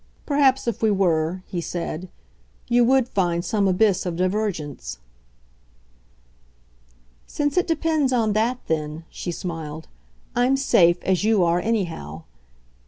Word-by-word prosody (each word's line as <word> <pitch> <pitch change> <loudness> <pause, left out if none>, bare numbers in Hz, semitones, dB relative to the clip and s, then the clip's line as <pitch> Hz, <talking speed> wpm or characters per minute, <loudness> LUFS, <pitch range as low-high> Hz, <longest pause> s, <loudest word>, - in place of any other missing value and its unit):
Perhaps 275 -3 +2
if 235 - -2
we 220 - +3
were," 180 -3 +1
he 175 - -4
said, 175 +1 -5 0.6
"you 240 0 +4
WOULD 260 0 +3
find 175 -5 0
some 205 -3 +1
abyss 195 +1 +2
of 175 -2 -3
divergence." 180 - -2 2.3
"Since 290 -1 -1
it 360 - +2
depends 315 -4 +1
on 225 -4 +1
that 235 +4 0
then," 155 0 -3
she 175 - -5
smiled, 160 -3 -6 0.5
"I'm 250 +3 +3
safe 175 -10 +3
as 190 0 +1
you 215 -3 +3
are 170 +1 +2
anyhow. 170 - -3
190 Hz, 125 wpm, -23 LUFS, 170-240 Hz, 2.3 s, you